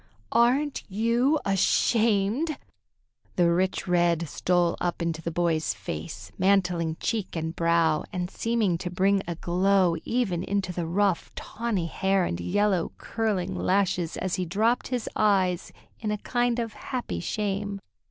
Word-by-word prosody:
"Aren't 260 +5 +2
you 235 +8 +2
ashamed?" 220 - +2 0.8
The 175 -1 +4
rich 185 +2 0
red 170 -2 +2
stole 175 +3 +1
up 175 -1 -1
into 165 -1 -2
the 170 - -3
boy's 165 -7 0
face, 100 +2 -7
mantling 180 -4 +2
cheek 215 -6 -2
and 160 0 -3
brow, 165 -2 +2
and 180 -3 -2
seeming 220 -7 0
to 180 - -4
bring 195 +2 +2
a 170 - -3
glow 180 +1 +2
even 220 -8 0
into 190 -1 -2
the 170 -1 -3
rough, 195 +1 +1
tawny 215 -6 -3
hair 190 +2 +1
and 85 - -3
yellow, 185 - +1
curling 215 -5 -2
lashes, 180 -3 0
as 185 -1 -2
he 185 - -1
dropped 220 +7 +1
his 250 -3 -3
eyes 190 -4 +2 0.3
in 215 - -3
a 210 - 0
kind 240 +2 0
of 230 -2 -3
happy 245 - -4
shame. 200 - -2
190 Hz, 145 wpm, -26 LUFS, 170-215 Hz, 0.8 s, The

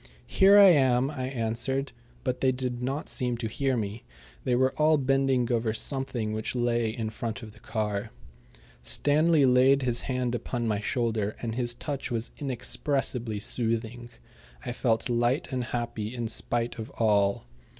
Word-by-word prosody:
"Here 200 +1 +5
I 200 -1 +9
am," 135 -4 +3
I 130 -4 -4
answered, 130 +2 -2 0.3
but 125 -2 -2
they 130 - +4
did 125 -1 -3
not 135 +4 -3
seem 125 -3 -1
to 115 - -3
hear 130 +3 0
me. 105 +1 -4 0.4
They 125 - +2
were 130 +1 +2
all 155 0 +5
bending 135 -2 +1
over 115 -2 0
something 120 -3 -1
which 110 +3 -3
lay 120 -2 +1
in 110 -1 -4
front 115 +2 -5
of 110 - -9
the - - -18
car. 105 -1 -3 0.7
Stanley 150 - +3
laid 130 +2 +4
his 120 -2 0
hand 125 -2 -2
upon 120 -1 -2
my 105 -2 0
shoulder, 110 -1 -1
and 115 -1 -2
his 120 0 -1
touch 140 +2 -4
was 115 -1 -2
inexpressibly 125 -3 -2
soothing. 115 +2 -3 0.6
I - - -2
felt 115 -1 0
light 120 +6 +1
and 125 -2 -2
happy, 115 -1 -4
in 120 -2 -2
spite 120 +1 -2
of 110 - -6
all. 100 - +2
120 Hz, 160 wpm, -27 LUFS, 115-130 Hz, 0.7 s, I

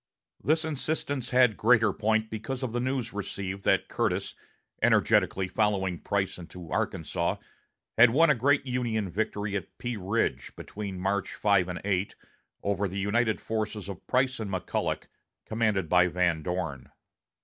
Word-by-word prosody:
This 160 +2 +2
insistence 145 -3 -2
had 125 -4 +4
greater 110 -3 +4
point 110 +1 0
because 120 +5 -4
of 125 - -2
the 120 - -1
news 130 -2 -2
received 100 -1 -4
that - - +3
Curtis, - - -1 0.5
energetically 95 -1 +3
following 95 -3 0
Price 100 -3 -1
into 85 -1 -10
Arkansas, - - -1 0.6
had 120 +1 +9
won 150 +6 +5
a - - +6
great 140 +3 +2
Union 115 -6 -1
victory 105 +1 -2
at 95 -5 -5
Pea 120 -2 -3
Ridge, 100 +4 -1
between 100 -3 -6
March 100 +1 -1
5 100 -4 +3
and 90 -1 -5
8, 100 -1 0 0.5
over 100 0 0
the 95 +2 -6
united 110 +3 +1
forces 110 -3 -3
of 100 -4 -8
Price 130 0 +1
and 110 -3 -4
McCulloch, 95 -2 -2 0.4
commanded 110 -5 0
by 90 +2 +5
Van 85 -2 +1
Dorn. 80 -6 -4
105 Hz, 150 wpm, -28 LUFS, 95-120 Hz, 0.6 s, had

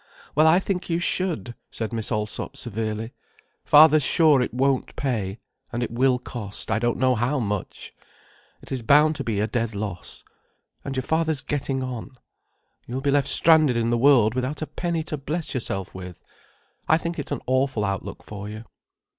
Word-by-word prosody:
"Well 155 +2 +4
I 160 +2 +6
think 190 -2 -3
you 165 - +1
should," 175 -7 0 0.2
said 110 0 -5
Miss 115 0 -2
Allsop 105 +5 -3
severely. 110 -1 -3 0.5
"Father's 155 +1 +7
sure 150 0 +5
it 125 - -1
won't 135 +1 0
pay—and 120 0 -4
it 120 - -4
will 125 +2 +2
cost 115 -4 -6
I 110 - +2
don't 120 0 0
know 130 0 +3
how 125 +5 0
much. 105 -4 -4 0.7
It - - -14
is 130 -2 -2
bound 150 +6 +4
to 140 - -3
be 110 -5 -2
a 105 - +2
dead 115 0 -2
loss. 100 -3 -5 0.6
And 140 - -5
your 130 - -1
father's 160 -1 0
getting 135 -2 -2
on. 130 +1 -6 0.7
You'll 130 +2 -4
be 140 0 +1
left 140 -1 +2
stranded 155 -7 +5
in 115 0 0
the - - +3
world 120 -3 +5
without 130 +4 -3
a - - -2
penny 165 +2 -3
to 155 -1 -4
bless 155 +3 -4
yourself 95 -7 -3
with. 90 -2 -9 0.7
I 160 - +5
think 170 0 -4
it's 145 - -6
an - - -3
awful 130 -4 +1
outlook 100 -1 -4
for 105 0 -8
you." 110 +1 -8
130 Hz, 180 wpm, -24 LUFS, 110-150 Hz, 0.7 s, Father's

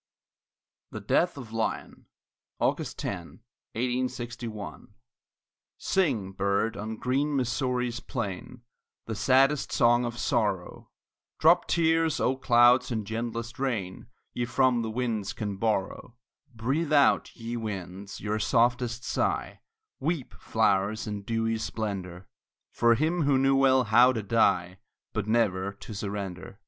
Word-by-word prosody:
THE - - -6
DEATH 175 -3 +1
OF 115 -5 -9
LYON 115 0 -3 0.5
[August - - -1
10, 90 +2 -6 0.4
1861] 120 -4 -4 0.8
Sing, 130 - 0
bird, 100 +3 0
on 110 +2 -5
green 140 +5 0
Missouri's 125 -1 -1
plain, 120 -1 -6 0.4
The 110 - -4
saddest 135 +6 +3
song 120 +1 +4
of 120 0 -4
sorrow; - - -1 0.5
Drop - - +4
tears, 165 -1 +2
O 130 - +1
clouds, 120 -1 +4
in 110 -3 -2
gentlest 115 +2 -4
rain 110 -9 -3 0.3
Ye 120 - -1
from 125 0 +2
the 110 - -3
winds 110 -3 -2
can 105 -3 -4
borrow; 110 +2 -2 0.4
Breathe 135 +8 -1
out, 140 -2 +3
ye 115 +1 -5
winds, 100 -3 -6
your 105 +1 -2
softest 120 +2 +1
sigh, - - -1 0.4
Weep, 160 -5 -2
flowers, 100 +3 +1
in 105 -2 -4
dewy 115 +1 -1
splendor, 100 -5 -5 0.4
For 120 0 +3
him 160 +6 0
who 140 -2 +3
knew 135 +1 +3
well 130 -1 +4
how 120 +3 +5
to 110 -3 -3
die, 95 -4 +1 0.3
But 110 -1 -2
never 100 -4 +1
to 105 +2 -10
surrender. 100 -2 -5
115 Hz, 125 wpm, -27 LUFS, 105-125 Hz, 0.8 s, how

